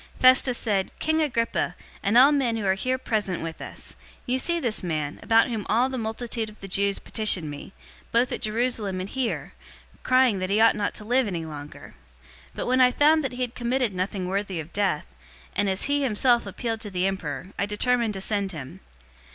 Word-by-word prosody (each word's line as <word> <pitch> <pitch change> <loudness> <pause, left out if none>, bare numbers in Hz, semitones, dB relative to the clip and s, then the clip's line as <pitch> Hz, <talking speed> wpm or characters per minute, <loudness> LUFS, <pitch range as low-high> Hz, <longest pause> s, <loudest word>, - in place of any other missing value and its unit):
025:024 - - -20
Festus 255 -1 +6
said, 200 -4 0
"King 315 0 +1
Agrippa, 235 -6 0 0.3
and 205 +3 +2
all 270 +4 +8
men 255 -6 +1
who 215 - -3
are 190 - +3
here 255 +7 -1
present 210 -9 -2
with 165 -1 -6
us, - - -7 0.3
you 255 +1 0
see 340 +5 +1
this 235 -8 -1
man, 155 -5 -3
about 225 +2 +4
whom 225 -3 -3
all 240 +4 +3
the 260 - -4
multitude 225 0 -2
of 215 - -15
the 195 - -8
Jews 200 +1 +1
petitioned 190 -8 +1
me, 145 +5 -9 0.4
both 235 +2 +2
at - - -4
Jerusalem 215 -3 -1
and 185 - -4
here, 255 +1 -3 0.5
crying 255 -5 +3
that 185 0 -2
he 205 +2 +2
ought 225 0 +5
not 205 -1 -2
to 210 - -9
live 250 +1 +2
any 170 -4 -3
longer. 150 -2 -9 0.6
025:025 - - -27
But - - -3
when 255 +1 +3
I 250 0 +6
found 305 +4 +4
that 265 - -3
he 250 - -6
had 240 -1 -4
committed 245 -2 -1
nothing 185 +1 -2
worthy 195 -2 -2
of 160 +2 -8
death, 195 -7 0 0.5
and 205 - +1
as 190 0 0
he 285 +1 +1
himself 240 -2 +2
appealed 225 +3 -4
to 210 - -6
the 185 -1 -1
emperor 180 -4 -3
I 200 - +1
determined 230 +1 +1
to 190 - -5
send 200 -1 -1
him. 135 - -8
215 Hz, 210 wpm, -25 LUFS, 190-250 Hz, 0.6 s, all